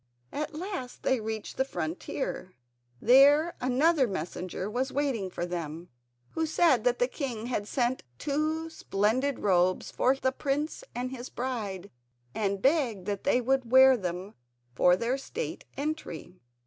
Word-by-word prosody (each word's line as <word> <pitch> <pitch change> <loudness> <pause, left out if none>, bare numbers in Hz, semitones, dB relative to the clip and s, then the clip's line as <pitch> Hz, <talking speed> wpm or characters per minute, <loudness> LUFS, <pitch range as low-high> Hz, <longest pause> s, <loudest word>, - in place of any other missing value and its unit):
At 300 +1 -4
last 350 -7 -5
they 260 - +2
reached 220 -1 -5
the 265 - +3
frontier; 180 -2 -4 0.4
there 285 +7 +6
another 265 +3 +3
messenger 185 0 -4
was 255 +5 -2
waiting 260 -9 -1
for 175 - -3
them, 170 -1 -5 0.4
who 320 0 -1
said 305 -7 +3
that 245 0 +3
the 245 - +2
king 250 -6 -4
had 225 -4 -2
sent 250 +1 0 0.2
two 310 +3 -1
splendid 245 +2 0
robes 185 -2 +2
for 260 +2 +2
the 260 -1 0
prince 290 - -2
and 250 +1 -3
his 255 -1 -7
bride, 210 -7 -4 0.4
and 200 0 -1
begged 260 - +2
that 200 -1 -3
they 255 -3 +3
would 255 -1 0
wear 260 0 +8
them 185 -1 -4 0.4
for 180 +8 +5
their 240 +7 -1
state 475 - -5
entry. 275 - -5
250 Hz, 145 wpm, -29 LUFS, 195-280 Hz, 0.4 s, wear